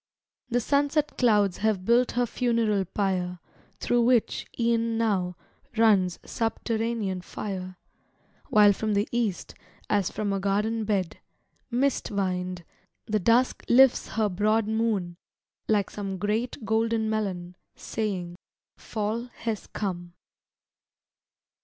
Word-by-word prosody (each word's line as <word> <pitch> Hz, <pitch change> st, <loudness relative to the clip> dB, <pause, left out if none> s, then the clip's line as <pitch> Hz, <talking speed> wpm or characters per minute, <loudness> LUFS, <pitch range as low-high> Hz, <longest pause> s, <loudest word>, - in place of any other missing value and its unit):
The 245 Hz, 0 st, +2 dB
sunset 285 Hz, +4 st, +1 dB
clouds 210 Hz, -6 st, +3 dB
have 205 Hz, -3 st, 0 dB
built 240 Hz, +3 st, +3 dB
her 245 Hz, 0 st, +2 dB
funeral 230 Hz, -4 st, +1 dB
pyre, 185 Hz, -2 st, -1 dB, 0.4 s
Through 240 Hz, 0 st, +2 dB
which, 240 Hz, -1 st, +2 dB
e'en 230 Hz, -1 st, +1 dB
now, 190 Hz, -6 st, 0 dB, 0.4 s
runs 200 Hz, -6 st, +4 dB
subterranean 225 Hz, -4 st, -2 dB
fire: 185 Hz, 0 st, -6 dB, 0.7 s
While 210 Hz, -1 st, +6 dB
from 215 Hz, +1 st, -1 dB
the 205 Hz, +2 st, +1 dB
East, 230 Hz, -6 st, -2 dB, 0.4 s
as 200 Hz, -4 st, +2 dB
from 205 Hz, -2 st, -2 dB
a 195 Hz, -, 0 dB
garden 210 Hz, +3 st, 0 dB
bed, 195 Hz, -5 st, -1 dB, 0.5 s
Mist 265 Hz, +2 st, +1 dB
vined, 185 Hz, -3 st, -2 dB, 0.4 s
the 215 Hz, 0 st, 0 dB
Dusk 235 Hz, +6 st, +2 dB
lifts 260 Hz, +1 st, +5 dB
her 220 Hz, -1 st, 0 dB
broad 210 Hz, +3 st, +1 dB
moon 215 Hz, -6 st, -1 dB, 0.5 s
like 205 Hz, -3 st, +1 dB
some 195 Hz, -2 st, -4 dB
Great 215 Hz, +4 st, -2 dB
golden 220 Hz, +1 st, +1 dB
melon 190 Hz, -5 st, -2 dB, 0.2 s
saying, 185 Hz, -5 st, -4 dB, 0.4 s
"Fall 220 Hz, +2 st, -3 dB, 0.2 s
has 225 Hz, -3 st, -3 dB
come." 175 Hz, -4 st, -4 dB
215 Hz, 115 wpm, -27 LUFS, 190-230 Hz, 0.7 s, While